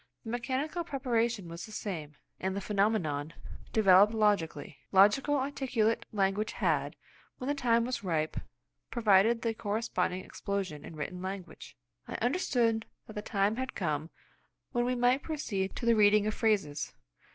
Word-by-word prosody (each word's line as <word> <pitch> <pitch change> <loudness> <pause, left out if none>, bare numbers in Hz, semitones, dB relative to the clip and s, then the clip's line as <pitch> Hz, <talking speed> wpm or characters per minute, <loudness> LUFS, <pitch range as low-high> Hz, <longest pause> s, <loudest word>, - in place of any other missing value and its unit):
The 225 - -6
mechanical 265 +8 -2
preparation 235 - -1
was 170 +1 -7
the - - -12
same, 160 -9 -5 0.2
and 190 0 -2
the - - -1
phenomenon 185 -8 0 0.4
developed 205 0 +6
logically. 170 -9 0
Logical 210 +10 +5
articulate 260 -5 0
language 200 +1 0
had, - - 0 0.4
when 255 - -6
the 285 - +2
time 235 -4 +2
was 250 -3 -3
ripe, 160 -4 -1 0.5
provoked 225 0 +4
the 230 -1 +1
corresponding 205 -4 -2
explosion 190 -7 -4
in 165 - -9
written 180 +4 -5
language. 185 - -7 0.3
I - - -5
understood 240 -5 +1 0.2
that 215 - -11
the 210 - -4
time 205 +1 0
had 260 0 -4
come 155 -3 -2 0.6
when 240 0 +1
we 250 +1 0
might 245 +2 +3
proceed 205 -12 -3
to - - -4
the 235 - +5
reading 210 0 +5
of 215 - 0
phrases. 195 -12 0
210 Hz, 150 wpm, -31 LUFS, 190-240 Hz, 0.6 s, developed